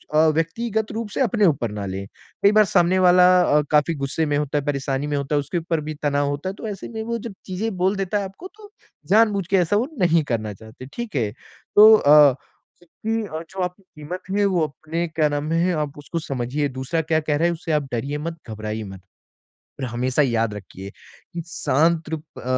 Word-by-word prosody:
अ, 155 +1 +5
व्यक्तिगत 220 +7 -1
रूप 225 -1 -4
से - - 0
अपने 225 -4 +2
ऊपर 140 -9 +2
पर 105 - -9
ना 100 -1 -4
लें। 95 +1 -5 0.4
कई 200 - +7
बार 215 0 +5
सामने 185 0 +3
वाला 180 0 +6
अ, 150 -3 +3
काफ़ी 150 +2 +3
गुस्से 140 +3 -1
में 145 -1 0
होता 150 0 -1
है, 145 - -2
परेशानी 140 0 -2
में 145 -1 -1
होता 140 +1 -2
है, - - +3
उसके 145 +5 -3
ऊपर 165 -1 -2
भी 155 +1 -5
तनाव 145 -1 +1
होता 145 +6 -3
है। 195 - -6
तो 220 - -7
ऐसे 200 -2 -7
में 225 -1 -5
वो 235 +1 -2
जो 230 -1 -7
चीज़ें 200 +3 -3
बोल 190 +3 +1
देता 195 +1 -1
है 200 - -2
आपको, 195 - -9
तो 420 -1 -14 0.4
जानबूझ 205 -2 +4
के 195 - +2
ऐसा 180 +2 +2
वो 235 +6 +1
नहीं 170 -3 +3
करना 110 -2 -2
चाहते। 110 +5 -12
ठीक 235 -6 -6
है? 110 -6 0 0.4
तो 215 +1 +9
अ, 145 - +6 0.5
जबकि 205 -1 -4
जो 190 -1 -5
आपकी 180 +2 -5
क़ीमत 175 0 -8
है, 205 +1 +2
वो 185 -4 +1
अपने 160 +3 -4
क्या 160 -1 +1
नाम 145 +1 -2
है? 170 +2 +2
आप 150 -2 -3
उसको 145 +3 -5
समझिए। 135 0 -2
दूसरा 130 +5 -2
क्या 160 0 +1
कह 150 -1 -1
रहा 165 - +1
है, 175 - +3
उससे 165 0 -5
आप 150 -1 +2
डरिए 135 +5 -2
मत, 165 +2 -4
घबराइए 110 0 -4
मत। 95 -2 -10 0.8
पर - - -4
हमेशा 125 +4 0
याद 115 -5 +1
रखिए 95 -1 -9
कि 170 +9 -11
शांत 160 +1 +2
त्रप 155 -1 -5 0.2
अ, - - -10
160 Hz, 220 wpm, -22 LUFS, 140-190 Hz, 0.8 s, तो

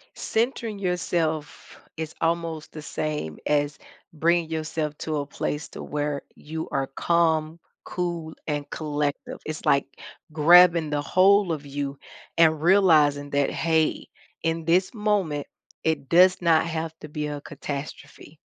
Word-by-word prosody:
Centering 230 -2 -1
yourself 170 -5 -2 0.2
is 160 -1 -5
almost 165 -1 -2
the 155 - -7
same 150 - -4
as 145 -1 0 0.3
bringing 165 +1 +1
yourself 155 -1 -3
to 155 -1 -2
a 145 - -2
place 150 +1 -4
to - - -9
where 145 -1 -3
you 160 +1 -6
are 135 -1 -1
calm, 160 +1 +1 0.3
cool, 170 -3 -3
and 145 -2 -3
collective. 145 -2 -3
It's 155 0 -6
like 140 0 +3 0.5
grabbin' 170 +1 +6
the 145 -1 -1
whole 190 +3 +4
of 150 -2 -6
you 140 0 -4 0.4
and 160 -2 +4
realizin' 155 -6 +4
that, 140 -1 +1
"Hey, 160 -1 0 0.3
in 165 0 -1
this 180 +3 +2
moment, 205 -9 0 0.4
it 160 -4 -1
does 180 +2 +5
not 165 -2 +4
have 160 -1 -3
to - - -9
be 150 0 -4
a 145 -1 -4
catastrophe." 145 +1 -8
160 Hz, 135 wpm, -25 LUFS, 150-170 Hz, 0.5 s, grabbin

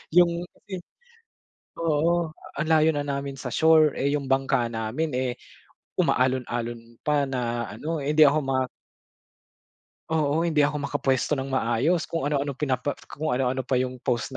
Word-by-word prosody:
Yung 175 0 +4 0.2
yun, 185 -2 -4 0.9
oo, 165 +1 +1 0.2
ang 155 +2 -2
layo 160 0 +4
na 145 - -1
namin 140 -1 -3
sa 130 -2 -6
shore 160 0 +5
eh, 140 +1 +1
yung 140 - -2
bangka 135 -2 +2
namin 115 +8 -2
eh 125 0 0 0.7
umaalon-alon 120 -2 -1
pa 150 -1 +2
na 120 -4 -2
ano. 155 +9 -4
Eh, 145 +2 -1
hindi 155 - +9
ako 145 +2 +5
ma 135 0 0 1.5
Oo, 160 +1 +1
hindi 155 -3 +2
ako 145 0 +1
makapwesto 135 +1 0
ng 135 -1 -2
maayos, 130 +7 +1
kung 160 -3 -2
ano-ano 140 -1 0
pinapa 135 0 -1 0.2
kung 155 -1 -2
ano-ano 130 0 0
pa 135 - -2
yung 130 0 0
pose 125 -1 -1
140 Hz, 150 wpm, -25 LUFS, 130-155 Hz, 1.5 s, hindi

